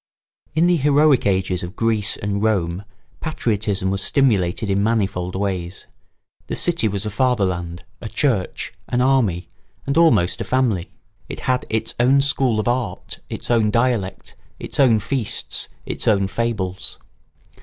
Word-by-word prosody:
] - - -42
In 160 +2 +4
the 175 -1 +4
heroic 145 -3 +4
ages 95 -2 0
of 90 +2 -7
Greece 110 -2 +1
and 100 0 -2
Rome 95 -3 0 0.3
patriotism 105 -9 -1
was 100 0 0
stimulated 105 -7 +2
in 100 0 +1
manifold 100 -5 0
ways. 95 -2 -3 0.6
The - - -3
city 170 -10 +1
was 100 0 -2
a 105 - -3
fatherland, 95 -8 0 0.2
a 110 - -6
church, 115 -10 -1
an 120 - 0
army, 125 -9 +2 0.4
and 140 +4 +1
almost 155 - +3
a - - 0
family. 120 -9 0 0.4
It - - -6
had 130 0 0
its 110 0 -1
own 130 +3 +5
school 135 -5 +1
of 110 - -1
art, 120 -1 -2
its - - -4
own 115 -3 +3
dialect, 115 -4 -1 0.2
its - - -6
own 125 -5 +6
feasts, 110 +2 -1 0.2
its - - -4
own 100 -2 +3
fables. 100 -3 -3
110 Hz, 150 wpm, -21 LUFS, 95-125 Hz, 0.6 s, own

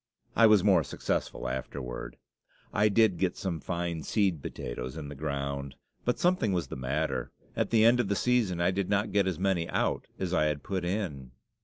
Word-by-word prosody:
I 115 - +7
was 105 -3 +5
more 95 -6 +5
successful - - -2
afterward. 60 -2 -5 0.6
I 105 +1 +4
did 105 -4 +3
get 90 -1 0
some 95 -6 -3
fine 85 -2 -3
seed 95 -4 +1
potatoes 60 +3 -5
in 75 -3 -6
the 75 - -7
ground. 70 -1 -3 0.3
But 125 - +1
something 175 - +2
was 90 -2 -1
the - - -5
matter; 70 +5 -2 0.2
at - - 0
the 110 -1 +5
end 120 +2 +6
of 120 - +1
the 100 - +1
season 115 -7 +1
I 85 +2 +3
did 95 0 -2
not 100 +1 +1
get 100 -1 +3
as 90 -4 -1
many 95 -3 0
out - - 0
as 95 -1 -2
I 75 - +3
had 75 -2 -1
put 95 -2 -2
in. 85 -9 -3
90 Hz, 195 wpm, -29 LUFS, 75-100 Hz, 0.6 s, I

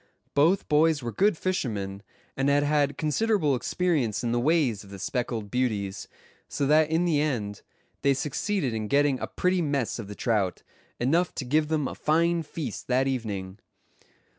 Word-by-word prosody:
Both 165 +7 +3
boys 150 -1 +3
were 120 - -3
good 200 - +2
fishermen, 105 - -2 0.3
and 135 +1 +1
had 145 0 +3
had 145 -1 +1
considerable 160 0 +1
experience 135 - 0
in 120 - 0
the 120 - +1
ways 135 - +1
of 100 - -15
the 100 - -8
speckled 115 0 -3
beauties; 105 -6 -1 0.4
so 140 - -1
that 155 +2 +4
in 165 +2 +2
the 155 -4 +2
end 110 -9 -2 0.4
they 140 -1 +3
succeeded 150 - -1
in 110 -1 -3
getting 140 +1 +2
a - - -3
pretty 180 0 0
mess 140 -8 -1
of 110 - -6
the 105 - -8
trout, 105 -6 0 0.4
enough 160 +8 +1
to 135 - -4
give 150 +4 +2
them 155 -3 0
a - - -5
fine 170 +2 +1
feast 145 -6 -6
that 130 +1 +2
evening. 105 -7 -3
140 Hz, 170 wpm, -27 LUFS, 115-155 Hz, 0.4 s, that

